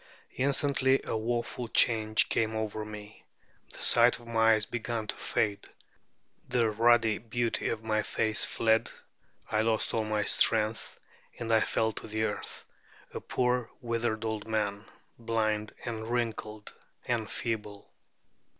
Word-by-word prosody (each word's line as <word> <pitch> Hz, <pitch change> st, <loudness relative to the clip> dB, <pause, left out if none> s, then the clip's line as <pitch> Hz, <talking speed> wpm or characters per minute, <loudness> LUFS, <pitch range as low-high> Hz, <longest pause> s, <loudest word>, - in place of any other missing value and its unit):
Instantly 135 Hz, 0 st, +2 dB
a -, -, -3 dB
woeful 120 Hz, +2 st, -2 dB
change 110 Hz, -2 st, +3 dB
came 110 Hz, 0 st, 0 dB
over 110 Hz, -1 st, -3 dB
me: 105 Hz, 0 st, -10 dB, 0.5 s
the -, -, -4 dB
sight 120 Hz, 0 st, +6 dB
of 120 Hz, -, -15 dB
my 115 Hz, -1 st, +4 dB
eyes 110 Hz, -1 st, 0 dB
began 115 Hz, -1 st, -3 dB
to -, -, -3 dB
fade, 100 Hz, -2 st, -1 dB, 0.8 s
the 120 Hz, -3 st, +2 dB
ruddy 115 Hz, 0 st, +3 dB
beauty 120 Hz, 0 st, -2 dB
of 110 Hz, -1 st, -3 dB
my 110 Hz, -1 st, +1 dB
face 110 Hz, 0 st, +2 dB
fled, 110 Hz, 0 st, +1 dB, 0.6 s
I 110 Hz, -, +2 dB
lost 110 Hz, 0 st, 0 dB
all 110 Hz, -, +1 dB
my 110 Hz, -1 st, -1 dB
strength, 110 Hz, +1 st, +1 dB, 0.4 s
and 115 Hz, -1 st, -2 dB
I 110 Hz, -, +6 dB
fell 110 Hz, +1 st, +1 dB
to -, -, -8 dB
the 110 Hz, 0 st, -2 dB
earth, 105 Hz, -1 st, -4 dB, 0.5 s
a -, -, -4 dB
poor 125 Hz, -2 st, 0 dB
withered 115 Hz, -2 st, -2 dB
old 110 Hz, -1 st, -3 dB
man, 105 Hz, -1 st, -2 dB, 0.3 s
blind 110 Hz, -2 st, -1 dB
and 110 Hz, -2 st, -4 dB
wrinkled 110 Hz, -3 st, -3 dB, 0.3 s
and 115 Hz, -3 st, -1 dB
feeble. 105 Hz, -3 st, -5 dB
110 Hz, 140 wpm, -29 LUFS, 110-115 Hz, 0.8 s, sight